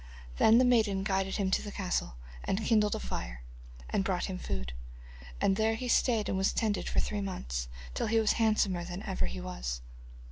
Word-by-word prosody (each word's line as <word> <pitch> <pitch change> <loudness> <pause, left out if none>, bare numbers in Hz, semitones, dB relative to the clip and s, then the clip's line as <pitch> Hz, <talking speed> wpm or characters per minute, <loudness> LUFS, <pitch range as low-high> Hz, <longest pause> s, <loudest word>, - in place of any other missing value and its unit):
Then 220 +1 +6
the 255 - +6
maiden 220 -6 +3
guided 195 0 0
him 195 -2 0
to - - +3
the 205 - -6
castle, 180 - -2 0.3
and 200 +3 -1
kindled 210 -2 +3
a - - -3
fire, - - -5 0.5
and 195 - +2
brought 185 -2 0
him 185 -1 -4
food. 65 - -4 0.7
And 195 - +2
there 220 0 +2
he 250 +3 -4
stayed 235 -3 +3
and 190 - 0
was 190 - +2
tended 215 -3 0
for - - +1
three 210 -1 -1
months, 60 - -3 0.3
till - - -1
he 225 +1 +3
was 220 -1 +3
handsomer 205 -5 +2
than 180 +3 -6
ever 195 -3 -1
he - - -6
was. 120 - -4
195 Hz, 200 wpm, -31 LUFS, 180-215 Hz, 0.7 s, Then